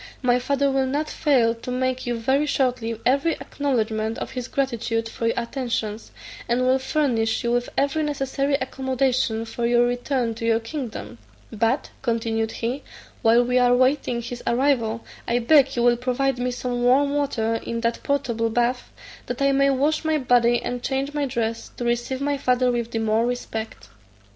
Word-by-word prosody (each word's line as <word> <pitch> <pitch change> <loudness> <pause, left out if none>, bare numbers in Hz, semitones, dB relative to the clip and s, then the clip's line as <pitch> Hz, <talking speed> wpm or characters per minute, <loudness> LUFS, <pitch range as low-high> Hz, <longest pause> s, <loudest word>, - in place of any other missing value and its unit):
My 250 0 +3
father 280 +2 +1
will 265 -1 +1
not 295 +3 -2
fail 250 -7 +3
to 230 +2 -9
make 255 0 -1
you, 240 - 0
very 270 +6 +1
shortly, 245 -5 0
every 280 +6 +3
acknowledgment 220 -5 -2
of - - -5
his 250 -1 -5
gratitude 235 -4 -1
for 230 0 -3
your 230 - 0
attentions, 235 -3 -3 0.4
and 245 +2 +2
will 260 +1 +3
furnish 250 -6 0
you 235 - 0
with 245 0 0
every 280 +3 +1
necessary 280 -1 0
accommodation 260 -4 0
for 235 +1 -2
your 240 0 +4
return 245 -1 -1
to 225 +1 -8
your 230 0 +3
kingdom: 240 0 -6 0.3
but," 230 +5 0
continued 225 -2 -1
he, 245 +4 -3 0.4
"while 230 +2 +5
we 250 +1 +2
are 245 0 +4
waiting 255 -2 +1
his 240 +1 -6
arrival, 235 -3 +1 0.2
I 235 - +2
beg 270 +2 +4
you 240 - +1
will 240 0 +4
provide 255 +1 0
me 250 +1 0
some 245 0 -3
warm 280 +3 +4
water 230 -6 0
in 230 0 -3
that 230 0 -1
portable 240 -5 0
bath, 245 +2 0 0.4
that 245 - -4
I 275 0 +3
may 275 0 +3
wash 290 +4 +1
my 315 -1 +1
body 240 -3 +3
and 245 0 -3
change 270 +3 -2
my 290 -1 0
dress, 230 -2 -3
to 240 - -3
receive 240 +3 -1
my 285 0 0
father 250 -1 +2
with 235 -1 -2
the 230 - -3
more 225 +1 +1
respect." 225 -2 -5
245 Hz, 175 wpm, -23 LUFS, 230-270 Hz, 0.4 s, while